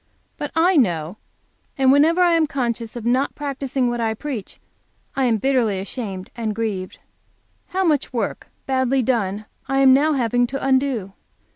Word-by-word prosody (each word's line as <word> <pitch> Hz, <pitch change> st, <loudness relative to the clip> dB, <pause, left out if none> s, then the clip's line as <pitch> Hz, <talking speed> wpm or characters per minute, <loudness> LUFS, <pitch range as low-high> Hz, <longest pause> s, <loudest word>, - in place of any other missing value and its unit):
But 290 Hz, -, -5 dB
I 345 Hz, +2 st, +4 dB
know, 175 Hz, -, +1 dB, 0.6 s
and 265 Hz, -1 st, +4 dB
whenever 315 Hz, +6 st, +4 dB
I 350 Hz, -1 st, +5 dB
am 330 Hz, -2 st, +3 dB
conscious 235 Hz, -4 st, -3 dB
of 235 Hz, -2 st, -6 dB
not 255 Hz, +4 st, +1 dB
practicing 275 Hz, -3 st, -2 dB
what 240 Hz, 0 st, -1 dB
I 220 Hz, -1 st, 0 dB
preach, 245 Hz, -5 st, -6 dB, 0.6 s
I 270 Hz, -2 st, +1 dB
am 230 Hz, -3 st, +2 dB
bitterly 235 Hz, -5 st, +1 dB
ashamed 195 Hz, -2 st, -6 dB
and 220 Hz, -3 st, -3 dB
grieved. 210 Hz, -5 st, -3 dB, 0.7 s
How 380 Hz, +1 st, -1 dB
much 305 Hz, -6 st, +1 dB
work, 230 Hz, -5 st, -3 dB, 0.2 s
badly 260 Hz, 0 st, +1 dB
done, 215 Hz, -4 st, -1 dB, 0.2 s
I 270 Hz, +1 st, 0 dB
am 265 Hz, -1 st, +7 dB
now 300 Hz, +3 st, +3 dB
having 245 Hz, -2 st, +1 dB
to 270 Hz, +2 st, -4 dB
undo. 260 Hz, -7 st, +1 dB
255 Hz, 160 wpm, -21 LUFS, 220-275 Hz, 0.7 s, am